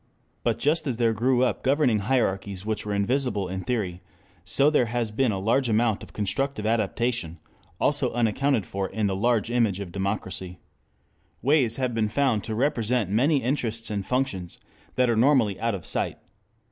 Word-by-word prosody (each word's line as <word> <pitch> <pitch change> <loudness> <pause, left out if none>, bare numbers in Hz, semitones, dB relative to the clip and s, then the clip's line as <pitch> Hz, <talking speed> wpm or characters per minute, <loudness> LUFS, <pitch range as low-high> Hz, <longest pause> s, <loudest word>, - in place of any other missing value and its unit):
But - - +1
just 155 +2 +1
as 125 -4 -1
there 115 -2 +2
grew 125 +3 +2
up 120 -5 0
governing 130 -5 +2
hierarchies 100 -4 -1
which 105 -1 -3
were 105 - -1
invisible 115 -1 0
in 95 +1 -4
theory, 100 -8 -2 0.4
so 140 +2 +3
there 125 -6 +3
has 120 -1 -2
been 120 +2 +1
a 100 - -2
large 115 +6 +1
amount 110 -1 +2
of - - -11
constructive 110 +3 -2
adaptation, 110 -4 -1 0.4
also - - +2
unaccounted 120 0 +1
for 95 -1 -3
in 110 -1 -2
the 105 +3 +1
image 115 -6 +1
of 100 -4 -6
democracy. 95 -1 -4 0.9
Ways 130 -4 +3
have 130 -2 -1
been 110 -2 0
found 125 -4 +1
to 110 - -3
represent 120 -5 0
many 135 +6 +2
interests 115 -4 -1
and 100 -2 -2
functions 100 -7 -2 0.4
that 125 0 +3
are 120 - +2
normally 115 -5 +3
out 115 -2 0
of 90 - -8
sight. - - 0
115 Hz, 170 wpm, -25 LUFS, 100-130 Hz, 0.9 s, so